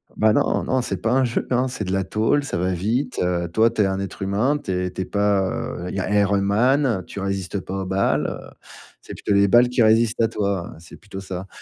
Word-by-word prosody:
Bah, 110 Hz, 0 st, +3 dB
non, -, -, +1 dB
non, 130 Hz, -1 st, 0 dB
c'est -, -, -3 dB
pas 115 Hz, -, 0 dB
un 130 Hz, 0 st, +3 dB
jeu, 120 Hz, -, -2 dB
hein, 125 Hz, +1 st, +2 dB
c'est 125 Hz, -4 st, -4 dB
de 95 Hz, -, -4 dB
la 95 Hz, 0 st, 0 dB
tôle, 110 Hz, +9 st, +1 dB
ça 140 Hz, -, -3 dB
va 90 Hz, +1 st, 0 dB
vite, 115 Hz, +9 st, -1 dB
heu, 85 Hz, -1 st, -1 dB
toi, 110 Hz, +5 st, +4 dB
tu 110 Hz, -2 st, -1 dB
es -, -, +4 dB
un 95 Hz, 0 st, -1 dB
être 100 Hz, 0 st, -6 dB
humain, 105 Hz, +10 st, +1 dB
tu 95 Hz, -, -6 dB
es 90 Hz, 0 st, -1 dB
tu -, -, -5 dB
es -, -, -2 dB
pas, 100 Hz, -1 st, +1 dB
heu, 90 Hz, +1 st, -5 dB
I -, -, -5 dB, 0.2 s
Iron 100 Hz, 0 st, +2 dB
Man, 115 Hz, +1 st, +2 dB
tu 100 Hz, -, -8 dB
résistes 95 Hz, 0 st, -3 dB
pas 95 Hz, +1 st, -5 dB
aux -, -, -4 dB
balles, 95 Hz, +1 st, +1 dB
heu, -, -, -7 dB, 0.5 s
c'est -, -, -10 dB
plutôt 100 Hz, -, -2 dB
les 100 Hz, 0 st, +4 dB
balles 120 Hz, +3 st, +6 dB
qui 125 Hz, -1 st, +2 dB
résistent 115 Hz, +1 st, +3 dB
à 115 Hz, -, +4 dB
toi, 100 Hz, -5 st, -2 dB
c'est 85 Hz, -, -13 dB
plutôt 100 Hz, -2 st, -9 dB
ça. 95 Hz, 0 st, -6 dB
100 Hz, 250 wpm, -22 LUFS, 95-115 Hz, 0.5 s, balles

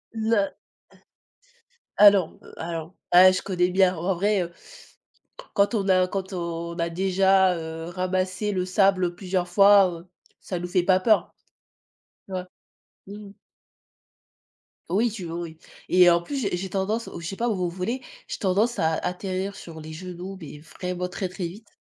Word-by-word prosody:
Non. 220 Hz, -2 st, +1 dB, 1.5 s
Alors 200 Hz, -5 st, +5 dB, 0.2 s
alors, 165 Hz, +1 st, -6 dB, 0.2 s
ouais 185 Hz, +1 st, +9 dB
je 185 Hz, -, -1 dB
connais 180 Hz, -2 st, +1 dB
bien. 185 Hz, 0 st, +3 dB
En 180 Hz, +3 st, -1 dB
vrai, 200 Hz, +2 st, +1 dB
heu, 175 Hz, -1 st, -4 dB, 1.0 s
quand 200 Hz, +4 st, +2 dB
on 200 Hz, -3 st, 0 dB
a 185 Hz, -1 st, +4 dB
quand 190 Hz, +1 st, -4 dB
on 170 Hz, -1 st, -4 dB
a 170 Hz, -, 0 dB
déjà, 190 Hz, 0 st, +3 dB
heu, 160 Hz, 0 st, -6 dB
ramassé 185 Hz, +2 st, -1 dB
le 185 Hz, -2 st, -1 dB
sable 185 Hz, -2 st, +2 dB
plusieurs 180 Hz, -1 st, -2 dB
fois, 200 Hz, +2 st, +6 dB, 0.2 s
heu, 180 Hz, -, -24 dB, 0.3 s
ça 180 Hz, -, -4 dB
ne 170 Hz, -, -7 dB
nous -, -, -3 dB
fait 180 Hz, 0 st, +2 dB
pas 185 Hz, 0 st, +4 dB
peur. 215 Hz, +1 st, +2 dB, 1.0 s
Ouais, 185 Hz, -2 st, -4 dB, 0.6 s
mmh. 205 Hz, 0 st, -10 dB, 1.6 s
Oui, 215 Hz, +7 st, +2 dB
tu 205 Hz, -4 st, -7 dB
oui, 170 Hz, -1 st, -5 dB
oui -, -, -30 dB, 0.3 s
et 180 Hz, -1 st, +6 dB
en 170 Hz, 0 st, +3 dB
plus, 225 Hz, +12 st, -6 dB
j'ai 200 Hz, -5 st, -1 dB
j'ai 190 Hz, +2 st, -5 dB
tendance, 205 Hz, +5 st, -2 dB
au -, -, -8 dB
je -, -, -8 dB
je -, -, -3 dB
sais 195 Hz, -, -5 dB
pas 240 Hz, -, 0 dB
au 230 Hz, -, +1 dB
au 180 Hz, -2 st, -1 dB
volley, 190 Hz, +9 st, -3 dB, 0.3 s
j'ai -, -, -5 dB
tendance 210 Hz, +4 st, +1 dB
à 160 Hz, 0 st, +2 dB
à -, -, -2 dB
atterrir 190 Hz, +2 st, -3 dB
sur 165 Hz, -4 st, -10 dB
les 155 Hz, 0 st, -9 dB
genoux, 180 Hz, +3 st, -7 dB
mais 150 Hz, -1 st, -9 dB
vraiment 180 Hz, +3 st, -5 dB
très, 185 Hz, +1 st, -4 dB
très 180 Hz, -1 st, -4 dB
vite. 205 Hz, +7 st, -12 dB
185 Hz, 175 wpm, -25 LUFS, 175-195 Hz, 1.6 s, ouais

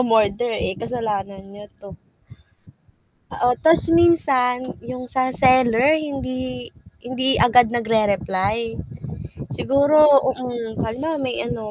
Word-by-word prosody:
umorder, 225 Hz, -1 st, +1 dB
eh, -, -, -2 dB
kasalanan 205 Hz, -5 st, -4 dB
niya 205 Hz, +1 st, -12 dB
'to. 200 Hz, -1 st, -12 dB, 1.4 s
Oo 245 Hz, 0 st, +1 dB
ta's 325 Hz, +1 st, +2 dB
minsan, 270 Hz, -7 st, +2 dB
yung 250 Hz, 0 st, -8 dB
sa 260 Hz, 0 st, -1 dB
seller 260 Hz, +2 st, +3 dB
hindi 255 Hz, -4 st, -6 dB, 0.3 s
hindi 260 Hz, +2 st, -1 dB
agad 245 Hz, 0 st, +5 dB
nag-rereply. 220 Hz, -1 st, -1 dB, 0.8 s
Siguro, 285 Hz, +3 st, +3 dB, 0.3 s
mm, 240 Hz, -3 st, -6 dB
halimbawa 290 Hz, +8 st, -4 dB
may 255 Hz, -2 st, -3 dB
ano, 220 Hz, -3 st, -6 dB
245 Hz, 105 wpm, -20 LUFS, 225-260 Hz, 1.4 s, agad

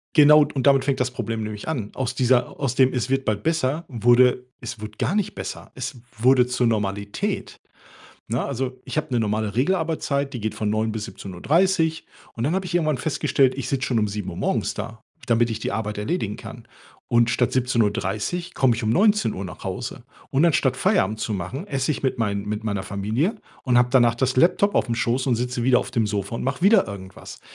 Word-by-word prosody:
Genau 150 Hz, 0 st, +8 dB
und 135 Hz, -1 st, -2 dB
damit 135 Hz, -1 st, +5 dB
fängt 135 Hz, -2 st, 0 dB
das 125 Hz, 0 st, +1 dB
Problem 115 Hz, -3 st, -4 dB
nämlich 105 Hz, +2 st, -6 dB
an. 120 Hz, -10 st, -3 dB
Aus 130 Hz, -1 st, -2 dB
dieser 125 Hz, -1 st, +1 dB
aus 135 Hz, -4 st, 0 dB
dem 130 Hz, 0 st, +4 dB
„es 125 Hz, -1 st, -1 dB
wird 135 Hz, 0 st, 0 dB
bald 105 Hz, -1 st, -1 dB
besser” 160 Hz, +1 st, 0 dB
wurde 125 Hz, +1 st, +4 dB, 0.2 s
„es 120 Hz, -3 st, -7 dB
wurde 110 Hz, 0 st, -7 dB
gar 195 Hz, -, 0 dB
nicht 210 Hz, -3 st, -1 dB
besser.” -, -, -7 dB
Es 130 Hz, +1 st, -5 dB, 0.2 s
wurde 125 Hz, +2 st, +5 dB
zur 125 Hz, 0 st, 0 dB
Normalität. 100 Hz, -2 st, -2 dB, 0.7 s
Ne, 120 Hz, +3 st, 0 dB
also, 130 Hz, -1 st, -4 dB
ich -, -, -6 dB
habe 155 Hz, 0 st, -2 dB
'ne 120 Hz, -, +2 dB
normale 110 Hz, 0 st, -1 dB
Regelarbeitszeit, 145 Hz, -2 st, 0 dB
die 120 Hz, -, -4 dB
geht 110 Hz, +1 st, -3 dB
von 105 Hz, -1 st, -2 dB
9:00 110 Hz, +1 st, 0 dB
bis 110 Hz, -1 st, -4 dB
17:30. 160 Hz, -, 0 dB, 0.3 s
Und 115 Hz, -, -3 dB
dann 150 Hz, +6 st, +1 dB
habe 190 Hz, 0 st, -1 dB
ich 175 Hz, -, -6 dB
irgendwann 155 Hz, -5 st, +1 dB
festgestellt, 135 Hz, -2 st, +1 dB
ich 135 Hz, -, -4 dB
sitze 135 Hz, -1 st, -1 dB
schon 120 Hz, -, +1 dB
um 105 Hz, -, +2 dB
7:00 105 Hz, -1 st, -5 dB
morgens -, -, -1 dB
da, 110 Hz, -1 st, -7 dB, 0.2 s
damit 115 Hz, 0 st, +2 dB
ich 110 Hz, -, -4 dB
die -, -, -2 dB
Arbeit 105 Hz, -2 st, -3 dB
erledigen 105 Hz, -, -2 dB
kann. -, -, -11 dB, 0.4 s
Und 120 Hz, 0 st, +3 dB
statt 120 Hz, +1 st, +1 dB
17:30 125 Hz, -, -1 dB
komme 125 Hz, -4 st, +3 dB
ich 120 Hz, -, -4 dB
um 110 Hz, -, +1 dB
19:00 190 Hz, -, +2 dB
nach 90 Hz, -, -9 dB
Hause. -, -, -5 dB, 0.3 s
Und 140 Hz, +4 st, +3 dB
anstatt 140 Hz, -6 st, +2 dB
Feierabend 105 Hz, -3 st, +1 dB
zu 110 Hz, -, -2 dB
machen, 105 Hz, -, -4 dB
esse 135 Hz, -4 st, -1 dB
ich 150 Hz, -, -2 dB
mit 130 Hz, -2 st, 0 dB
meinen 100 Hz, -3 st, -1 dB
mit 105 Hz, +1 st, -3 dB
meiner 100 Hz, -3 st, -2 dB
Familie 105 Hz, -, -1 dB, 0.3 s
und 125 Hz, -2 st, +3 dB
habe 125 Hz, 0 st, +4 dB
danach 120 Hz, -3 st, +4 dB
das 130 Hz, +2 st, 0 dB
Laptop 195 Hz, +7 st, +3 dB
auf'm 120 Hz, -, +1 dB
Schoß 120 Hz, +3 st, 0 dB
und 130 Hz, -, +3 dB
sitze 125 Hz, +1 st, -2 dB
wieder 125 Hz, -1 st, +5 dB
auf -, -, -7 dB
dem 115 Hz, -4 st, +1 dB
Sofa 100 Hz, +1 st, -3 dB
und -, -, -4 dB
mache 135 Hz, +1 st, -2 dB
wieder 200 Hz, +1 st, +5 dB
irgendwas. 95 Hz, -2 st, -9 dB
125 Hz, 210 wpm, -23 LUFS, 110-140 Hz, 0.7 s, Genau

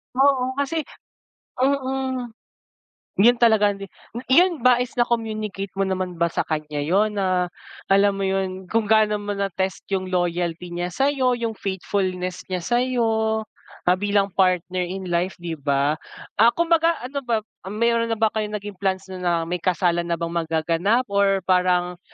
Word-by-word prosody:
Oo, 260 Hz, -1 st, +3 dB
kasi 285 Hz, +3 st, -1 dB, 0.8 s
mm. 260 Hz, -2 st, -1 dB, 0.9 s
Yun 240 Hz, +5 st, +6 dB
talaga 220 Hz, -4 st, +4 dB
ni 200 Hz, -, -9 dB, 0.5 s
Yun 340 Hz, -3 st, +4 dB
ba 250 Hz, -1 st, +5 dB
is 250 Hz, +1 st, -3 dB
na-communicate 215 Hz, -5 st, -2 dB
mo 195 Hz, -, +1 dB
naman 185 Hz, -2 st, -2 dB
ba 170 Hz, 0 st, 0 dB
sa -, -, 0 dB
kanya 150 Hz, -1 st, -3 dB
yun, 200 Hz, +8 st, +1 dB
na 180 Hz, -2 st, +1 dB, 0.4 s
alam 200 Hz, 0 st, +4 dB
mo 195 Hz, -, -3 dB
yun, 190 Hz, -1 st, -1 dB
kung 225 Hz, -1 st, +1 dB
gaano 215 Hz, -1 st, +3 dB
mo 205 Hz, 0 st, -4 dB
na-test 190 Hz, -2 st, -2 dB
yung 190 Hz, -1 st, -1 dB
loyalty 175 Hz, -1 st, -1 dB
niya 175 Hz, +1 st, -2 dB
sa'yo, 265 Hz, +4 st, +1 dB
yung 230 Hz, -1 st, -2 dB
faithfulness 185 Hz, -2 st, -3 dB
niya 185 Hz, -2 st, -3 dB
sa'yo, 225 Hz, -2 st, +1 dB, 0.4 s
ah, 180 Hz, +1 st, +3 dB
bilang 200 Hz, -1 st, +1 dB
partner 180 Hz, -1 st, +1 dB
in 190 Hz, +1 st, -5 dB
life, 175 Hz, +2 st, 0 dB
'di 170 Hz, -3 st, -6 dB
ba? 140 Hz, +2 st, +1 dB, 0.4 s
Ah, 225 Hz, -, +7 dB
kumbaga 335 Hz, 0 st, +3 dB
ano 270 Hz, +3 st, -3 dB
ba, 235 Hz, -5 st, -1 dB, 0.2 s
meron 230 Hz, +3 st, +1 dB
na 225 Hz, -, 0 dB
ba 220 Hz, 0 st, +2 dB
kayong 215 Hz, -1 st, -2 dB
naging 205 Hz, -2 st, -7 dB
plans 190 Hz, -1 st, 0 dB
na 185 Hz, -, -6 dB
na 175 Hz, -1 st, +1 dB
may 175 Hz, +2 st, -3 dB
kasalan 175 Hz, -1 st, +1 dB
na 170 Hz, -, 0 dB
bang 170 Hz, 0 st, -4 dB
magaganap, 165 Hz, +8 st, +1 dB
or 200 Hz, -1 st, +2 dB
parang 180 Hz, -1 st, +1 dB
195 Hz, 155 wpm, -23 LUFS, 180-230 Hz, 0.9 s, Ah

